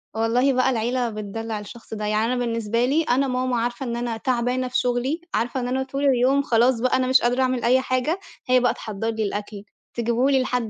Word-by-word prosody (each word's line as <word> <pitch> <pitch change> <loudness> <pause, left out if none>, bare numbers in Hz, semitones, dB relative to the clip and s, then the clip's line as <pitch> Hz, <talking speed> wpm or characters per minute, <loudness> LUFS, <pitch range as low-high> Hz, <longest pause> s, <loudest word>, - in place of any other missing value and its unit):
والله 245 +4 +2
بقى 255 +1 +2
العيلة 240 0 0
بتدلّع 215 +1 -5
الشخص 220 +2 -11
ده، 210 -1 -4
يعني 215 +1 +1
أنا - - 0
بالنسبة 230 0 0
لي 300 +6 +2
أنا 270 0 +1
ماما 255 0 -1
عارفة 240 +3 -2
إن 235 -1 -3
أنا 235 -1 -3
تعبانة 250 +1 0
في 250 - -1
شُغلي، 250 +7 0
عارفة 245 +3 -1
إن 245 - -2
أنا 260 +1 0
طول 275 +2 -4
اليوم 265 +1 +3
خلاص 240 -1 +2
بقى 255 +1 +2
أنا 255 0 0
مش 260 0 +5
قادرة 245 +2 +1
أعمل 255 -2 0
أي 255 +2 +4
حاجة، 260 +8 -1 0.3
هي 255 0 +5
بقى 245 - +2
تحضّر 220 +1 -4
لي 225 -1 -2
الأكل، 205 0 -4 0.3
تجيبه 235 +3 +1
لي 270 -2 +3
لحد 250 -3 -1
245 Hz, 220 wpm, -23 LUFS, 230-255 Hz, 0.3 s, مش